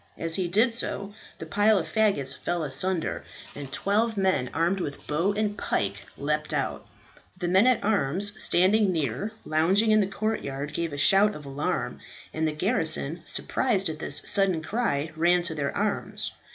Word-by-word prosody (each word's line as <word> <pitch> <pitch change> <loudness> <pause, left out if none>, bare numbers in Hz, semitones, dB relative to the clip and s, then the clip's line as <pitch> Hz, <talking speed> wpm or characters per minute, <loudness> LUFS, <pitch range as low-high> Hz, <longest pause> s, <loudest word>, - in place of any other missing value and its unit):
As 165 0 -1
he 180 +1 +1
did 220 +7 +2
so 205 -3 -1 0.2
the - - -7
pile 205 +6 +3
of 180 - -1
faggots 195 -12 0
fell 175 -2 -3
asunder, 160 +5 -1 0.3
and 140 -2 -8
twelve 215 +7 0
men 185 -10 +1
armed 170 +5 0
with 145 -5 -5
bow 170 +7 0
and 210 0 -1
pike 100 - -2
leaped 150 +1 -2
out. - - -3 0.5
The 175 -1 -3
men 190 +7 +4
at 255 -2 +2
arms 200 0 +1
standing 195 +3 +3
near, 155 - -2
lounging 190 +8 +2
in 215 - +5
the 200 - +2
courtyard, 150 -9 -3
gave 170 -2 -2
a 145 - -6
shout 200 +7 +5
of 150 - -10
alarm, 140 +2 -3 0.3
and 160 0 0
the - - 0
garrison, 160 - -1
surprised 200 -8 0
at 155 -1 -6
this - - 0
sudden 190 -5 +4
cry, 160 -8 -1
ran 175 +2 +3
to 170 -1 0
their 140 -2 -2
arms. 205 0 -2
175 Hz, 170 wpm, -26 LUFS, 150-205 Hz, 0.5 s, in